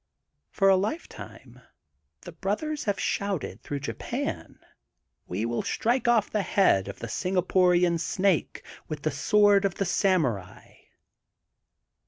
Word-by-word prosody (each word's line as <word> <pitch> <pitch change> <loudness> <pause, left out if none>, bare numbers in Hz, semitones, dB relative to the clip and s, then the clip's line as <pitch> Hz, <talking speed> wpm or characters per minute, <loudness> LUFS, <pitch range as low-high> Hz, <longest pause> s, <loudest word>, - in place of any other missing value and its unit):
For 195 - +1
a 195 - +6
lifetime 215 - -5 0.6
the - - -10
brothers 290 +10 -3
have 205 -2 0
shonted 200 -5 -2
through 145 -1 -5
Japan: - - -5 0.7
We 95 +6 -2
will 120 0 -1
strike 245 +3 0
oflP 235 -3 +2
the 210 - 0
head 190 - +2
of 100 - -7
the 115 - -6
Singapore 180 - +2 0.2
Snake 185 +2 0 0.2
with 150 -2 -6
the 155 - 0
Sword 205 +7 +4
of 195 -3 0
the 195 - -1
Samurai.'' 145 - -1
190 Hz, 125 wpm, -26 LUFS, 145-205 Hz, 0.7 s, a